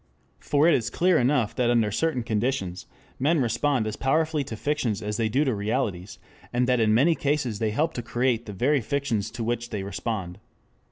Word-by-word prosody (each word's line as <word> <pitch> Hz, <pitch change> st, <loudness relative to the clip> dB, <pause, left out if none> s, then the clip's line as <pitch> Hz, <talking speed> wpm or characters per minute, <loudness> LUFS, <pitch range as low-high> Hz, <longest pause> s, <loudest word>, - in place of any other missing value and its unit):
For 145 Hz, -, +2 dB
it 170 Hz, -, +5 dB
is 120 Hz, -1 st, +1 dB
clear 180 Hz, +2 st, +3 dB
enough 125 Hz, -3 st, +1 dB
that 125 Hz, -1 st, +1 dB
under 115 Hz, -3 st, +2 dB
certain 130 Hz, +1 st, 0 dB
conditions 105 Hz, -5 st, -2 dB, 0.3 s
men 155 Hz, +5 st, +2 dB
respond 125 Hz, 0 st, +1 dB
as 110 Hz, 0 st, -3 dB
powerfully 155 Hz, +3 st, +1 dB
to 115 Hz, -, -6 dB
fictions 120 Hz, -5 st, -1 dB
as 105 Hz, 0 st, -3 dB
they 115 Hz, -1 st, 0 dB
do 135 Hz, +7 st, +2 dB
to 130 Hz, -, +1 dB
realities, 105 Hz, -3 st, -2 dB, 0.3 s
and 125 Hz, +1 st, +1 dB
that 125 Hz, -1 st, +2 dB
in 110 Hz, -1 st, +3 dB
many 140 Hz, +10 st, +4 dB
cases 140 Hz, -8 st, -1 dB
they 110 Hz, -, 0 dB
help 155 Hz, +9 st, 0 dB
to 120 Hz, -, -4 dB
create 120 Hz, 0 st, -1 dB
the 105 Hz, -, -6 dB
very 135 Hz, +8 st, +2 dB
fictions 135 Hz, -5 st, -1 dB
to 120 Hz, -, -5 dB
which 120 Hz, +1 st, -2 dB
they 100 Hz, -2 st, -4 dB
respond. 100 Hz, -2 st, -4 dB
120 Hz, 200 wpm, -25 LUFS, 110-140 Hz, 0.3 s, it